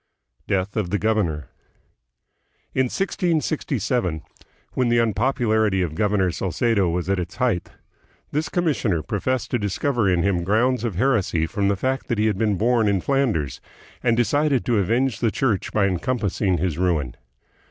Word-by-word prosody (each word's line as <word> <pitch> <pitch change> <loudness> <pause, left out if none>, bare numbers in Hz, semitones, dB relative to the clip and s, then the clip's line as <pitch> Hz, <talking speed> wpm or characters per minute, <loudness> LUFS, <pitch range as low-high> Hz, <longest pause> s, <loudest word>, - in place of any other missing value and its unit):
Death 95 +1 -1
of 105 -6 -1
the 105 - +1
Governor. 90 - 0 1.2
In 130 - +2
1667, 135 - -1 0.5
when 125 -2 +1
the 120 - +3
unpop 115 +3 +1
ularity 110 -6 +2
of 80 - -6
Governor 95 +1 +1
Salcedo 95 +3 0
was 85 0 -2
at 100 -1 +1
its 90 0 -5
height, 120 -9 0 0.6
this 150 +2 -1
com 175 -1 0
missioner 105 - 0
professed 125 +5 -2
to 120 - +1
discover 110 +2 0
in 90 -2 +2
him 95 -3 +1
grounds 115 +6 +1
of 115 -6 -2
heresy 100 -8 +1
from 100 +3 -1
the 100 - +2
fact 130 +6 -2
that 120 - -1
he 105 - +2
had 105 -3 0
been 105 -3 +2
born 115 +1 +2
hi 100 -2 +2
Flanders, 105 - 0 0.4
and 115 -2 +2
decided 145 +2 +2
to 120 -4 +2
avenge 120 +6 +1
the 115 - +2
Church 110 -4 -1
by 105 -2 +2
encompassing 100 -1 0
his 85 -1 -2
ruin. 80 -9 0
105 Hz, 165 wpm, -23 LUFS, 90-125 Hz, 1.2 s, the